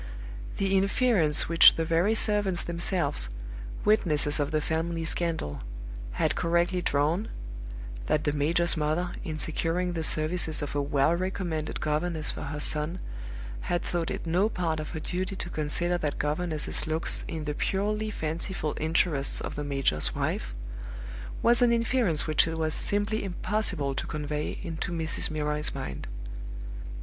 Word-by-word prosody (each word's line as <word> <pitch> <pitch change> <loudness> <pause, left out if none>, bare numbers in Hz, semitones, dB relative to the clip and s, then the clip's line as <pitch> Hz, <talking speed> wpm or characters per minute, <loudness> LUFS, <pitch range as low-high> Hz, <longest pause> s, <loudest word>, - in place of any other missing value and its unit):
The 195 0 +1
inference 195 -5 +4
which 165 0 +8
the 165 - 0
very 170 +7 +3
servants 205 -5 +3
themselves, 170 - +1 0.6
witnesses 155 -9 +3
of 145 -1 +1
the 155 -1 +1
family 165 +1 -1
scandal, 160 - -1 0.5
had - - +1
correctly 170 +2 +1
drawn 155 +8 +1 0.8
that 150 - +2
the 145 - +1
major's 165 +4 +3
mother, 160 +3 0
in 160 -4 -4
securing 170 +3 0
the 165 - -2
services 160 0 +2
of 145 - -4
a 145 - +1
well 140 +3 +2
recommended 175 -4 -2
governess 155 +1 0
for - - -6
her 150 +1 -4
son, 155 +3 +1 0.7
had 175 - +1
thought 170 -2 -1
it - - -4
no 180 +6 +2
part 165 -6 -1
of 155 - -4
her 160 - -4
duty 185 +4 -3
to 175 -2 -5
consider 170 +3 0
that 150 -3 -2
governess's 155 +1 0
looks 160 +1 0
in 160 -3 -4
the 150 -1 -2
purely 210 +6 0
fanciful 160 -2 -2
interests 155 -3 +1
of - - -4
the 150 - -4
major's 135 - +1
wife - - -2 0.9
was 235 0 +5
an 240 -1 +6
inference 230 -8 +3
which 155 0 +4
it 165 0 -3
was 155 -1 0
simply 205 +2 0
impossible 190 -7 0
to - - -3
convey 150 0 -3
into 165 -1 -3
Mrs. 160 -2 0
Milroy's 150 -1 0
mind. 65 -3 -5
165 Hz, 150 wpm, -28 LUFS, 150-180 Hz, 0.9 s, which